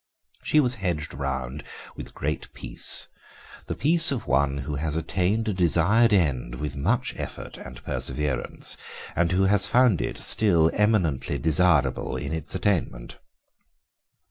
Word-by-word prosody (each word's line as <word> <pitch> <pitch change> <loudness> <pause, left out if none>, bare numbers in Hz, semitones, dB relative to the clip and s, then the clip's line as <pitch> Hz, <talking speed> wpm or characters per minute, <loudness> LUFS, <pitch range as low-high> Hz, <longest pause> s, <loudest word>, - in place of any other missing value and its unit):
She 155 - +2
was 125 -4 +1
hedged 85 -6 -3
round 65 +1 -5 0.3
with - - -8
a - - -18
great 75 +2 -4
peace, - - +3 0.6
the - - -4
peace 165 +2 +5
of 120 -5 -3
one 70 0 0
who 70 +1 -5
has 75 +1 -3
attained 95 +7 -1
a 105 - 0
desired 95 +6 +3
end 70 -11 0
with 75 +2 -6
much 70 - -1
effort - - -8
and - - -11
perseverance, 70 0 -2 0.4
and 85 0 +1
who 95 +1 +1
has 100 0 +2
found 120 -6 +3
it - - -4
still 85 -7 +4
eminently 105 - 0
desirable 80 -4 +1
in - - -5
its 80 +2 -3
attainment. 90 - -2
85 Hz, 145 wpm, -24 LUFS, 70-105 Hz, 0.6 s, peace